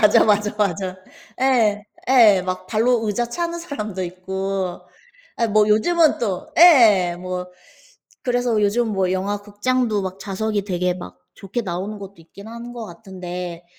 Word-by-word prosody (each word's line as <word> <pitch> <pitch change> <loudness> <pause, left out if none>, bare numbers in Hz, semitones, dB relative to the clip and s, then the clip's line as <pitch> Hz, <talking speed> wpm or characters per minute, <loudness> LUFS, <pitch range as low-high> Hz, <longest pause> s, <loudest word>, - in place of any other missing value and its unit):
맞아, 210 -1 +6
맞아, 210 0 +2
맞아. 190 -2 -1 0.4
예. 225 -6 +2 0.2
예. 220 -8 +6
막 185 0 -4
발로 225 +1 +1
의자 225 +4 -1
차는 340 +5 -3
사람도 215 - -5
있고 190 +1 -4 0.6
아 230 - +1
뭐 210 0 +4
요즘은 315 +10 +3
또 195 -6 -3
예예. 220 - +6
뭐 180 0 -5 0.7
그래서 245 -3 0
요즘 225 +3 +1
뭐 190 -3 0
영화 200 +2 -2
극장도 210 +1 -1
막 190 0 -5
좌석이 205 +1 -2
되게 180 -2 -1
막 90 - -10
좋게 200 +5 -4
나오는 195 +3 -4
것도 200 0 -10
있기는 200 +6 -13
하는 235 +1 -8
것 235 -2 -7
같은데 180 -3 -8
205 Hz, 275 characters per minute, -21 LUFS, 185-230 Hz, 0.7 s, 맞아